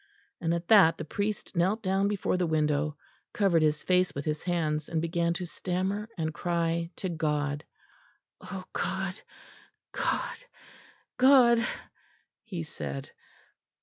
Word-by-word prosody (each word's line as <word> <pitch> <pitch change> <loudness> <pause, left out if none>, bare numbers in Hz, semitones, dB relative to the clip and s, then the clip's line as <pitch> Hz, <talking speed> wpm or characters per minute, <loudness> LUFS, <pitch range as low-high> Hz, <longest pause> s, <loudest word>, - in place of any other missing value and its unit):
And 165 -1 0
at 170 0 -4
that 195 -7 +7
the - - -5
priest 205 +4 -3
knelt 190 +6 +1
down 195 +1 +2
before 205 -2 0
the 180 -1 +1
window, 150 -1 +1 0.4
covered 190 -6 +3
his 150 -1 +2
face 180 0 +2
with 140 - -4
his 150 -1 -1
hands, 155 -4 -1
and 165 - 0
began 170 +1 0
to 180 - -3
stammer 190 +5 -2
and 160 -2 -2
cry 170 -1 -1
to 190 - -4
God: 150 -3 -1 0.8
"O 185 0 -7
God! 190 0 -2 0.8
God! - - -1 0.8
God!" 250 -3 +6 0.8
he 180 -7 -5
said. 70 - -6
170 Hz, 130 wpm, -29 LUFS, 155-190 Hz, 0.8 s, that